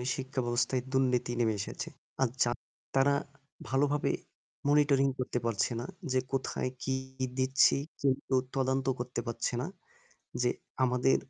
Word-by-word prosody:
শিক্ষা 130 0 -2
ব্যবস্থায় 120 +1 +1
দুর্নীতি 125 -2 +2
নেমে 115 -2 +3
এসেছে। - - -5 0.3
আর 130 - +4
জা 120 - +1 0.4
তারা 140 +1 +5 0.5
ভালোভাবে 145 +2 +2 0.6
monitoring 145 -2 +5
করতে 125 -1 0
পারছে 115 -2 +1
না 120 - -4 0.3
যে 130 - +4
কোথায় 130 -1 0
কি 130 - +1 0.4
দিচ্ছি। 130 +1 +5 0.2
কেউ 135 -1 +2 0.2
তদন্ত 130 0 +1
করতে 125 0 -3
পারছে 115 +1 -1
না 135 - -2 0.8
যে 125 - +4 0.3
আমাদের 125 +1 +4
130 Hz, 130 wpm, -31 LUFS, 125-135 Hz, 0.8 s, তারা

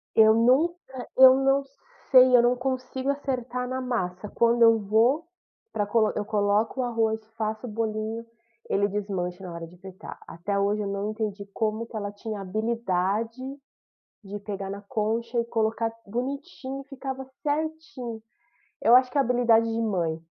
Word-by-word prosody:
Eu 220 0 +7
nunca 260 +3 +1
eu 260 0 +10
não 270 +1 +2 0.5
sei, 255 -1 +8
eu - - +6
não 240 +1 +3
consigo 260 +1 -3
acertar 250 -3 -2
na 260 +1 -3
massa, 205 -6 -3
quando 235 +2 +2
eu 230 -1 +7
vou 225 +9 +2 0.5
pra 205 -1 -1
co 215 0 +2
eu 210 - -1
coloco 210 +4 +1
o - - 0
arroz, 225 -2 0 0.2
faço 220 +1 -3
o - - -5
bolinho, 220 +1 -3 0.5
ele 200 +1 +2
desmancha 195 -3 -3
na 180 - -7
hora 170 0 -6
de 175 - -16
fritar. 190 0 -10
Até 185 +4 -3
hoje 205 +1 +1
eu 200 - -3
não 200 +1 -2
entendi 215 -2 -4
como 220 +1 -2
que 225 - -7
ela 205 -1 -4
tinha 205 0 -6
habilidade 220 +2 -1 0.8
de 200 +1 -7
pegar 200 -1 -5
na 200 +1 -6
concha 230 +3 -1
e 235 - 0
colocar 225 0 0
bonitinho, 270 +3 -5
e 275 - -17
ficava 265 -1 -6 0.2
certinho. 295 -6 -3 0.6
Eu 235 - +7
acho 255 0 +4
que 285 - -1
é - - +6
habilidade 240 -3 +3
de 230 +1 -1
mãe. 175 -7 -1
225 Hz, 165 wpm, -26 LUFS, 205-255 Hz, 0.8 s, eu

